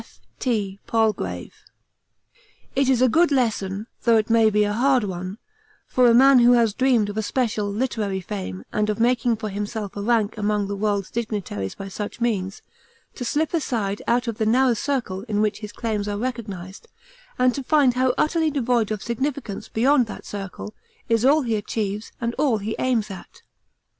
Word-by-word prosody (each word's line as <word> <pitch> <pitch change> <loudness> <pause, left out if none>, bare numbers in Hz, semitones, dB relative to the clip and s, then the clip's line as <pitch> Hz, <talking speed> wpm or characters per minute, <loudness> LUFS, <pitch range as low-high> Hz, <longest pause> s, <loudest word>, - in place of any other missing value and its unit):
F.T. 205 -6 -4
PALGRAVE. 220 -2 -1 1.2
It 270 0 +2
is 255 -1 +3
a - - +6
good 330 +7 +3
lesson 215 -6 0 0.2
though 230 -2 +4
it 215 +1 0
may 225 -1 +5
be 210 0 +2
a 205 0 0
hard 255 +2 +3
one 185 0 -5 0.5
for 250 -1 +3
a - - +5
man 265 +1 +7
who 240 +1 +6
had 230 -4 +3
dreamed 255 -5 +3
of 205 - -6
a - - +1
special 215 -2 -1
(literary) 210 -4 -1
fame 180 - -6
and 210 0 +1
of 210 - -1
making 240 0 +2
for 215 -1 -5
himself 205 0 -4
a 205 - -4
rank 220 -1 +1
among 205 -1 0
the 200 +1 -4
world's 200 -1 -1
dignitaries 205 - -3
by 195 - -7
such 205 +3 -6
means, 200 -5 -2 0.5
to 250 - -6
slip 300 +7 -1
aside 220 -11 -1
out 240 +1 +1
of 230 -2 -4
the 220 - +1
narrow 250 +2 +4
circle 230 -6 -2
in 210 -2 -1
which 210 -1 0
his 210 -1 -7
claims 215 -3 -3
are 205 0 -2
recognised, 210 - -5 0.5
and 250 0 +3
to 275 - -4
find 275 -2 +3
how 255 0 +1
utterly 320 0 +2
devoid 245 -6 +1
of 215 -2 -3
significance 240 -2 -3
beyond 255 +2 +3
that 215 - -9
circle 200 +1 -7 0.4
is 230 -1 +2
all 290 +3 +4
he 230 -3 0
achieves 210 0 -3
and 235 0 -2
all 275 -7 +3
he 215 +2 -4
aims 230 -5 0
at. 190 - -11
225 Hz, 185 wpm, -23 LUFS, 205-250 Hz, 1.2 s, man